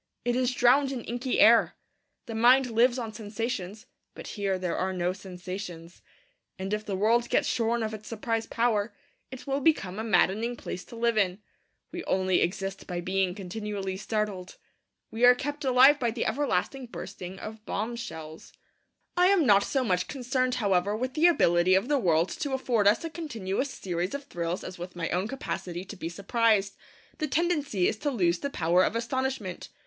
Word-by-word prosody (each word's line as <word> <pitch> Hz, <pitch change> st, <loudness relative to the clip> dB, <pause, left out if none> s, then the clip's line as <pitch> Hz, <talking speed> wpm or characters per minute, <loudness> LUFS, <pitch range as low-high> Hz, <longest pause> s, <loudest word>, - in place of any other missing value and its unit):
It 240 Hz, 0 st, +1 dB
is 255 Hz, 0 st, +1 dB
drowned 260 Hz, +3 st, +4 dB
in 250 Hz, -4 st, -4 dB
inky 245 Hz, +2 st, -2 dB
air. 230 Hz, +1 st, +6 dB, 0.5 s
The 230 Hz, -, -6 dB
mind 245 Hz, +3 st, +4 dB
lives 240 Hz, +3 st, +3 dB
on 225 Hz, -3 st, -4 dB
sensations; 215 Hz, -1 st, -5 dB, 0.3 s
but -, -, -8 dB
here 200 Hz, -3 st, -1 dB
there 180 Hz, -2 st, -2 dB
are 190 Hz, +1 st, -1 dB
no 180 Hz, 0 st, 0 dB
sensations. 180 Hz, -2 st, -8 dB, 0.6 s
And 190 Hz, +1 st, -4 dB
if 210 Hz, 0 st, -1 dB
the 205 Hz, -2 st, -3 dB
world 230 Hz, +5 st, +2 dB
gets -, -, +2 dB
shorn 230 Hz, 0 st, 0 dB
of 220 Hz, 0 st, -3 dB
its 215 Hz, 0 st, -8 dB
surprise 225 Hz, 0 st, -2 dB
power, 230 Hz, -2 st, 0 dB, 0.3 s
it 260 Hz, -1 st, -9 dB
will 275 Hz, 0 st, -1 dB
become 215 Hz, -, +1 dB
a -, -, -2 dB
maddening 225 Hz, +2 st, +2 dB
place 180 Hz, -, -6 dB
to -, -, -12 dB
live 230 Hz, -1 st, +1 dB
in. 185 Hz, -2 st, +1 dB, 0.5 s
We 350 Hz, -1 st, -5 dB
only 185 Hz, -1 st, +1 dB
exist 195 Hz, +2 st, -2 dB
by 175 Hz, -2 st, -3 dB
being 185 Hz, 0 st, 0 dB
continually 200 Hz, 0 st, -4 dB
startled. 200 Hz, -2 st, -3 dB, 0.5 s
We 225 Hz, +2 st, -3 dB
are 245 Hz, 0 st, +8 dB
kept 290 Hz, +3 st, -4 dB
alive 265 Hz, +2 st, +6 dB
by 240 Hz, -, +1 dB
the 230 Hz, +1 st, -2 dB
everlasting 255 Hz, 0 st, -1 dB
bursting 190 Hz, -4 st, -8 dB
of 215 Hz, +2 st, -8 dB
bombshells. 200 Hz, -8 st, -5 dB, 0.6 s
I 360 Hz, +1 st, +5 dB
am 380 Hz, -5 st, +4 dB
not 200 Hz, -4 st, +6 dB
so 270 Hz, -2 st, 0 dB
much 180 Hz, -5 st, 0 dB
concerned, 255 Hz, 0 st, -1 dB
however, 200 Hz, -1 st, +1 dB
with 255 Hz, +2 st, -3 dB
the 325 Hz, +3 st, +5 dB
ability 175 Hz, -, +4 dB
of 195 Hz, +8 st, +1 dB
the 290 Hz, -2 st, +3 dB
world 170 Hz, -4 st, +2 dB
to 285 Hz, -2 st, -4 dB
afford 240 Hz, -6 st, +1 dB
us 205 Hz, -, +4 dB
a 330 Hz, -, -3 dB
continuous 260 Hz, -, -3 dB
series 180 Hz, -1 st, -3 dB
of 285 Hz, -, -5 dB
thrills 170 Hz, -6 st, -4 dB
as 185 Hz, -, -8 dB
with 175 Hz, +1 st, -7 dB
my 165 Hz, -1 st, -3 dB
own 185 Hz, +3 st, 0 dB
capacity 185 Hz, -, -5 dB
to 205 Hz, -, -9 dB
be 165 Hz, -3 st, -5 dB
surprised. 200 Hz, +2 st, +1 dB, 0.4 s
The 310 Hz, -, -1 dB
tendency 295 Hz, -, +1 dB
is -, -, -1 dB
to 290 Hz, +6 st, -1 dB
lose 175 Hz, -9 st, +1 dB
the 280 Hz, -, -3 dB
power 175 Hz, -5 st, +2 dB
of -, -, 0 dB
astonishment. 235 Hz, -5 st, -3 dB
215 Hz, 185 wpm, -28 LUFS, 185-250 Hz, 0.6 s, are